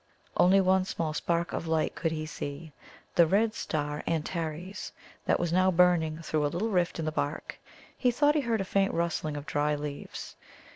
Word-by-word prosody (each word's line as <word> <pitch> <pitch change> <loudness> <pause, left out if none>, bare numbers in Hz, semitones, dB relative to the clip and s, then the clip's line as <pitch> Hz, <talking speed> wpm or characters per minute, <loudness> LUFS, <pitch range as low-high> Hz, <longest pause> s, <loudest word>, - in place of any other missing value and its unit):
Only 190 +2 +6
one 190 0 +4
small 160 -4 -2
spark 170 +2 -1
of 165 - -3
light 160 -1 +1
could 165 -2 -1
he 155 -1 -3
see 150 +1 -6 0.4
the 170 -1 +5
red 215 +5 +2
star 150 -6 -2
Antares, 165 +3 -3 0.3
that - - +2
was 170 -1 0
now 185 +1 +4
burning 165 -3 +3
through 155 -1 0
a - - +3
little 190 +9 -1
rift 180 -4 +1
in 165 - -2
the 155 - 0
bark. 145 0 -3 0.4
He 250 - +2
thought 290 +5 +3
he 300 - +2
heard 230 -5 0
a - - -2
faint 195 +1 +1
rustling 165 -3 -1
of 145 - -6
dry 150 0 +1
leaves. 145 -1 -6
170 Hz, 190 wpm, -29 LUFS, 155-185 Hz, 0.4 s, Only